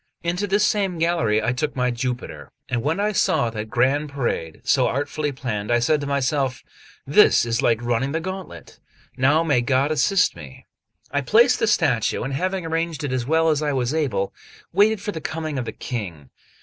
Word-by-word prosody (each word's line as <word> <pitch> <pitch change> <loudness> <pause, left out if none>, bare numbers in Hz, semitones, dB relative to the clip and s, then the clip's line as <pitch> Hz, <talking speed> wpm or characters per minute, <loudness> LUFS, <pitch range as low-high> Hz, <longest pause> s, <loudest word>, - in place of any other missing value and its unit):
Into 175 +4 -1
this 205 +2 +2
same 195 -5 0
gallery 160 -11 +1
I 115 +3 +1
took 145 +4 -2
my 125 -1 +1
Jupiter; 120 - -5 0.2
and 120 -2 -1
when 155 +8 -1
I 210 +1 +1
saw 120 - +1
that 110 -1 -6
grand 135 +6 +1
parade, 120 - -3
so - - +3
artfully 145 +2 -2
planned, 115 -6 -4
I 120 - +4
said 145 +5 +1
to 140 - -4
myself: 140 -2 -1 0.4
"This - - +5
is 115 +1 -1
like 115 -2 +1
running 120 +3 0
the 160 - -1
gauntlet; 185 +2 -8 0.4
now 145 +5 +3
may 145 -7 +2
God 135 +4 +1
assist 180 +7 +2
me." 75 -6 -12 0.5
I 145 0 0
placed 220 - +4
the 225 - +1
statue, 145 - +1
and 135 +3 -4
having 185 +5 -2
arranged 165 -1 -2
it 140 -3 -2
as 125 -1 -2
well 160 +1 +3
as 155 -1 +1
I 150 -1 0
was 130 0 -1
able, 115 -12 -1 0.4
waited 210 0 +3
for 210 - -3
the 160 - -6
coming 155 -3 -4
of 125 - -3
the - - -4
King. 90 - -6
140 Hz, 195 wpm, -22 LUFS, 120-165 Hz, 0.5 s, This